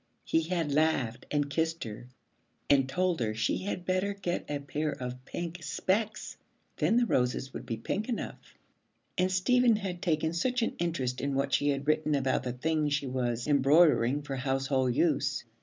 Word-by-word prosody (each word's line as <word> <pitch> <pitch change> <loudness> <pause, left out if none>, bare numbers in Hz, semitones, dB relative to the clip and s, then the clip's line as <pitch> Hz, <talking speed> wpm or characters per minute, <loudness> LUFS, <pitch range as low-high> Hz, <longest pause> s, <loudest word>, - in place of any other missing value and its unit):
He 160 - +2
had 165 -2 -1
laughed 135 -6 +1
and 145 -1 +1
kissed 160 +3 -1
her 110 +2 -8 0.6
and 135 -2 +4
told 180 +4 +1
her 110 -2 -1
she 110 - 0
had 185 -2 -4
better 185 +2 0
get 180 -3 -3
a 145 - -1
pair 145 +2 -3
of 125 -1 -6
pink 170 +3 -5
specs, 195 +9 -1 0.4
then 230 - +2
the 245 - +4
roses 125 - 0
would 120 - -7
be 115 -2 -2
pink 205 - -3
enough. 240 - -5 0.6
And 185 +1 +1
Stephen 235 +6 +4
had 190 -4 -4
taken 160 -3 0
such 245 +7 0
an - - -1
interest 135 -7 -1
in 140 0 -1
what 140 0 0
she 145 - +3
had 140 0 -1
written 155 -1 +2
about 135 -1 +1
the 125 -1 -3
things 150 +2 0
she 145 - -2
was 120 -2 -1
embroidering 145 -1 +4
for 140 -2 -4
household 130 -1 0
use. - - +1
150 Hz, 175 wpm, -30 LUFS, 130-175 Hz, 0.6 s, and